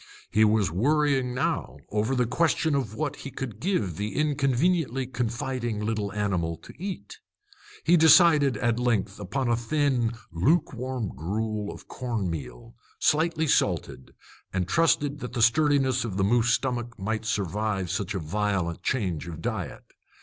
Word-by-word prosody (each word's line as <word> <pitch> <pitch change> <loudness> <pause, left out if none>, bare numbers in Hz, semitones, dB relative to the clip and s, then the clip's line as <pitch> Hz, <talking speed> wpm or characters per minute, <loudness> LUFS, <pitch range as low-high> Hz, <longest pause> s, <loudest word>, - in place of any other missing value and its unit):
He 110 - +4
was 105 -3 +3
worrying 135 - +1
now - - -1
over 110 +5 0
the 125 -1 +2
question 160 +4 +1
of 130 -7 -1
what 150 +1 -2
he 135 - -7
could 120 -6 -6
give 115 - -1
the 105 +1 -3
inconveniently 145 -1 +1
confiding 120 -1 -3
little 105 -1 -2
animal 90 -6 -1
to - - -12
eat. 180 - -6 0.7
He 175 +2 +6
decided, 155 - +6
at 120 +1 0
length, 120 -6 0
upon 125 +7 -2
a 120 - +3
thin, 125 -1 0 0.2
lukewarm 125 - 0
gruel 105 +7 -3
of - - -12
corn 115 -8 -3
meal, 85 - -7 0.2
slightly 160 +1 +2
salted, 65 - 0 0.4
and 95 -2 -1
trusted 150 - +2
that 125 -2 -6
the 120 - -1
sturdiness 130 +1 +3
of 105 -5 -4
the 95 - +2
moose 115 +3 +3
stomach 120 -2 -1
might 110 +3 -2
survive 105 -2 -1
such 100 0 -2
a - - -1
violent 90 0 -1
change 90 -9 -1
of 80 -2 -7
diet. - - -4
120 Hz, 150 wpm, -26 LUFS, 105-140 Hz, 0.7 s, He